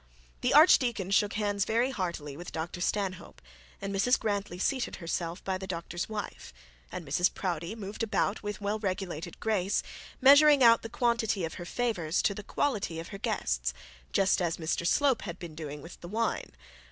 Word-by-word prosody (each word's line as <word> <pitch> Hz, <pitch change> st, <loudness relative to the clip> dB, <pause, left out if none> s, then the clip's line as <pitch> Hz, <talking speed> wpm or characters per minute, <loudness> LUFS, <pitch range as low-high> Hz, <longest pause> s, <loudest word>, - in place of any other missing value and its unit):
The 250 Hz, +2 st, +2 dB
archdeacon 240 Hz, -, +5 dB
shook 205 Hz, 0 st, +3 dB
hands 205 Hz, -2 st, 0 dB
very 235 Hz, +5 st, +1 dB
heartily 170 Hz, -, -4 dB
with 175 Hz, +4 st, -8 dB
Dr 165 Hz, +2 st, -5 dB
Stanhope, 190 Hz, -1 st, -2 dB, 0.4 s
and 200 Hz, 0 st, -4 dB
Mrs 225 Hz, +6 st, +3 dB
Grantly 200 Hz, -4 st, -2 dB
seated 255 Hz, +7 st, -1 dB
herself 170 Hz, 0 st, -4 dB
by 190 Hz, -1 st, -2 dB
the 190 Hz, -, -6 dB
doctor's 175 Hz, 0 st, -4 dB
wife. 210 Hz, -, -6 dB, 0.4 s
And 170 Hz, -, -6 dB
Mrs 175 Hz, +6 st, +2 dB
Proudie 175 Hz, +1 st, -3 dB
moved 205 Hz, 0 st, -7 dB
about 220 Hz, -1 st, 0 dB
with 205 Hz, -1 st, -5 dB
well 205 Hz, +2 st, -1 dB
regulated 185 Hz, -5 st, -4 dB
grace, 205 Hz, -3 st, 0 dB, 0.4 s
measuring 285 Hz, +1 st, +7 dB
out 230 Hz, -1 st, +7 dB
the 225 Hz, -, -7 dB
quantity 225 Hz, -6 st, +1 dB
of 160 Hz, -, -6 dB
her -, -, -6 dB
favours 185 Hz, -6 st, -1 dB
to 200 Hz, -, +2 dB
the 210 Hz, -, -7 dB
quality 205 Hz, -, -1 dB
of 165 Hz, -, -7 dB
her 195 Hz, -, -8 dB
guests, 65 Hz, -, -1 dB, 0.4 s
just 190 Hz, -1 st, +3 dB
as 170 Hz, -1 st, 0 dB
Mr 170 Hz, +1 st, -1 dB
Slope 275 Hz, +3 st, +3 dB
had 175 Hz, -3 st, -6 dB
been 170 Hz, -4 st, -8 dB
doing 150 Hz, -2 st, -7 dB
with 170 Hz, -, -11 dB
the 175 Hz, -, -8 dB
wine. 225 Hz, +5 st, -2 dB
195 Hz, 175 wpm, -29 LUFS, 170-220 Hz, 0.4 s, measuring